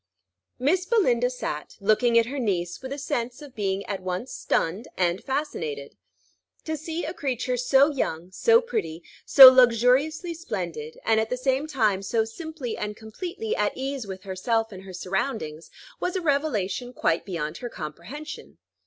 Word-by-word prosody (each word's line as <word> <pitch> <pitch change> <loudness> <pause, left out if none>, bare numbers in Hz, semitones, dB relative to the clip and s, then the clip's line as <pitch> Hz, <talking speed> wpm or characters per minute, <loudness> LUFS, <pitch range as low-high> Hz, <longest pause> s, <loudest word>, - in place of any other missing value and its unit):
Miss 355 +8 +1
Belinda 250 - +3
sat, 150 -12 -5
looking 220 +4 +3
at 230 - +5
her 275 +4 -4
niece, 180 -7 -1
with 260 0 -7
a 280 - -3
sense 255 -4 -3
of 290 -3 -11
being 195 -2 -2
at 195 -2 -4
once 185 +7 -4
stunned 185 +8 -1
and 175 0 0
fascinated. 160 - -3 0.7
To 315 - -2
see 320 +2 -4
a 320 - -4
creature 255 -5 -2
so 265 +4 +4
young, 175 - -3
so 460 - +4
pretty, 165 - -4 0.2
so 270 -2 +12
luxuriously 255 +7 +3
splendid, 170 - -5
and 220 -1 +4
at 220 0 -1
the 250 - -1
same 265 +3 0
time 215 -10 +1
so 220 +3 0
simply 285 0 -6
and 210 0 -5
completely 360 - -5
at - - 0
ease 265 -3 -3
with 190 -1 -7
herself 225 +4 -1
and 190 -2 -9
her 190 - -9
surroundings, 180 - -3 0.3
was 360 - -2
a 375 - 0
revelation 255 - -1
quite 165 -7 0
beyond 165 -4 -4
her 240 - -6
comprehension. 185 - -8
240 Hz, 160 wpm, -25 LUFS, 190-285 Hz, 0.7 s, so